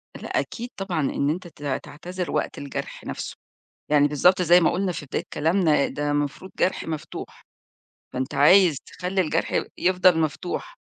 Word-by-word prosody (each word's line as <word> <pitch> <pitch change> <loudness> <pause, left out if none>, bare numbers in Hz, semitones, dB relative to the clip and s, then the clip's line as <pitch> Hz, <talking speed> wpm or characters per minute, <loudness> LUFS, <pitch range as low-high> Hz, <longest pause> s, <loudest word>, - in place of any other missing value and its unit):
لأ - - -2
أكيد 240 +1 -5
طبعًا 190 -4 -2
إن 140 0 0
أنت 175 +3 -3
ت 145 - -14 0.2
تعتذر 180 +4 -6
وقت - - -1
الجرح 140 0 -6
نفسه، - - -5 0.5
يعني 145 -1 +4
بالضبط 180 +6 +4
زي 175 +1 +6
ما 165 - +4
قُلنا 185 0 0
في 150 - -7
بداية - - -3
كلامنا، 160 -2 +2
ده 145 0 -2
مفروض 145 +6 -2
جرح 185 - +1
مفتوح، 160 -2 -6 0.7
فأنت 130 0 -3
عايز 170 +2 +6
تخلي 185 +2 -2
الجرح 160 -5 0
ي - - +1
يفضل 185 -1 +4
مفتوح، 155 -4 -3
165 Hz, 160 wpm, -24 LUFS, 145-185 Hz, 0.7 s, زي